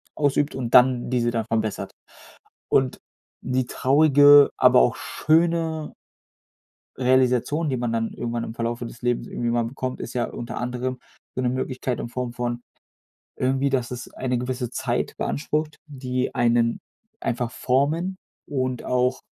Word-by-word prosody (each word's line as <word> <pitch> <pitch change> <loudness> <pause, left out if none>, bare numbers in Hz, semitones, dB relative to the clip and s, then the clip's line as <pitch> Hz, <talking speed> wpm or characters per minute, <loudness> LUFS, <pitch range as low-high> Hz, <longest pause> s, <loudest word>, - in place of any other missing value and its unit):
ausübt 145 0 +1
und 120 -3 -4
dann 125 -1 +5
diese 120 -2 +1
dann 115 -2 -2
verbessert. 110 -3 -2 0.8
Und, 130 -1 +2 0.5
die 130 -1 0
traurige, 145 +1 +6
aber - - +6
auch 60 - +2
schöne 160 -1 0 1.0
Realisation, 130 +4 +2
die 130 - 0
man 120 -1 -2
dann 115 0 -1
irgendwann 115 0 -3
im 115 - -7
Verlaufe 120 +1 -3
des 115 0 -10
Lebens 120 0 -1
irgendwie 120 -1 -3
mal 120 0 +1
bekommt, 130 +1 -4
ist - - -6
ja 120 -2 0
unter 120 -1 -6
anderem, 125 +1 -3 0.4
so 130 - -1
'ne 125 - +1
Möglichkeit 130 -1 -3
in - - -4
Form 125 -1 -4
von 120 -1 -3 0.8
irgendwie, 135 +2 +1
dass 125 -3 -1
es 120 - -6
eine 125 -1 -1
gewisse 125 -1 -3
Zeit - - -2
beansprucht, 150 +1 -2
die 130 -3 -3
einen 115 0 +2 0.4
einfach 120 0 -2
formen 155 +9 0 0.3
und 130 -3 -2
auch 125 +1 +1
125 Hz, 145 wpm, -24 LUFS, 120-135 Hz, 1.0 s, traurige